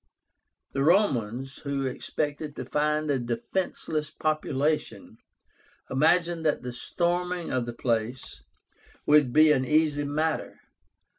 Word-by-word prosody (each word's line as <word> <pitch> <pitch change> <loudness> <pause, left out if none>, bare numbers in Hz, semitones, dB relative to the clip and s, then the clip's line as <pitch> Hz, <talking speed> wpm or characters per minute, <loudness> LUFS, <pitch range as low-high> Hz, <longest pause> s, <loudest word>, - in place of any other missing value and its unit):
The 135 - -2
Romans, 135 - +1
who 140 -1 -2
expected 145 +3 -3
to - - -5
find 150 0 0
a 135 - +1
defenceless 150 +5 -3
population, 155 -1 -2 0.7
imagined 165 +4 +2
that 150 -5 +1
the 125 -1 -5
storming 175 +5 -1
of 125 -2 0
the 120 - -4
place 115 - -2 0.6
would 150 -4 +5
be 155 +3 +6
an 135 -3 +3
easy 150 +1 +2
matter. 155 +3 -2
150 Hz, 115 wpm, -27 LUFS, 130-155 Hz, 0.7 s, be